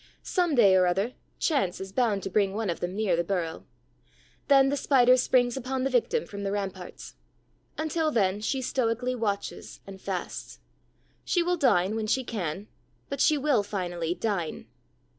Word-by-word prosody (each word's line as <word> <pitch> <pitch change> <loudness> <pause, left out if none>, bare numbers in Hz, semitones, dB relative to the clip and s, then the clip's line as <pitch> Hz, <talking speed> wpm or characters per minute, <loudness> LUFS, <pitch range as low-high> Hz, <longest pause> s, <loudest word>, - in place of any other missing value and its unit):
Some 350 -5 +1
day 200 -6 +6
or 185 -1 +4
other, 195 +7 0 0.2
chance 265 - 0
is 190 0 -7
bound 210 -3 +1
to - - -3
bring 200 -1 +1
one 215 -4 -1
of 170 - -5
them 180 +2 -3
near 205 -4 +1
the 170 - 0
burrow. 170 -3 -3 0.8
Then 270 -1 +6
the 285 - 0
Spider 255 -3 +5
springs 245 -1 +2
upon 260 0 -3
the 270 - 0
victim 255 - +1
from 200 0 -8
the 195 -1 -2
ramparts. 195 -3 -5 0.6
Until 315 0 0
then, 205 -6 +1
she 260 +4 -1
stoically 250 0 0
watches 210 -5 -4
and 195 -1 -11
fasts. 185 -3 -5 0.6
She 350 - +1
will 355 +1 +1
dine 215 - +2
when 220 -1 -2
she 260 +4 +1
can; 195 -4 -4 0.4
but 280 -1 -3
she 305 - +4
will 280 -5 +2
finally 175 -4 -3
dine. 195 -8 -3
215 Hz, 170 wpm, -27 LUFS, 190-260 Hz, 0.8 s, day